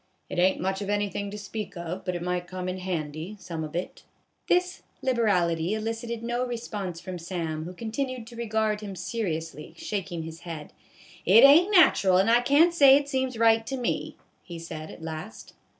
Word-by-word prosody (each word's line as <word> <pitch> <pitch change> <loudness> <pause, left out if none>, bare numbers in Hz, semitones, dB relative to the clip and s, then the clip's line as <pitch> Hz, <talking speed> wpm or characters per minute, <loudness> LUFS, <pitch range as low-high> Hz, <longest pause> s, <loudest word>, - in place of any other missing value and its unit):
" - - -45
It - - -2
ain't 185 +1 +3
much 190 +2 -2
of 200 - -4
anythin' 205 0 -1
to 205 - -7
speak 205 -1 -6
of, 170 +2 -5
but 180 -1 -2
it 175 - -4
might 180 0 -2
come 185 0 -5
in 185 0 -3
handy, 170 +1 -4
some 165 -4 -5
of 155 0 -7
it." 175 - -4 0.5
This 360 0 +1 0.2
liberality 190 -7 +1
elicited 225 +1 -4
no 240 +1 -1
response 215 -8 -4
from 180 0 -7
Sam, 165 -2 -4
who 180 - -7
continued 240 +3 -4
to 235 +1 -12
regard 220 -2 -1
him 200 -2 -6
seriously, 165 - -4
shaking 180 -5 -4
his 160 0 -8
head. 165 -4 -8 0.3
" - - -21
It 215 +7 +8
ain't 310 +7 +8
natural 205 - +5
and 195 +4 +4
I 240 +1 +5
can't 290 +7 +4
say 280 -5 +8
it 285 0 -3
seems 260 -3 -1
right 225 0 +4
to 270 - -3
me," 245 - -2 0.2
he 170 -2 -9
said 165 -2 -7
at 160 - -11
last. 155 -8 -7
195 Hz, 195 wpm, -27 LUFS, 170-235 Hz, 0.5 s, It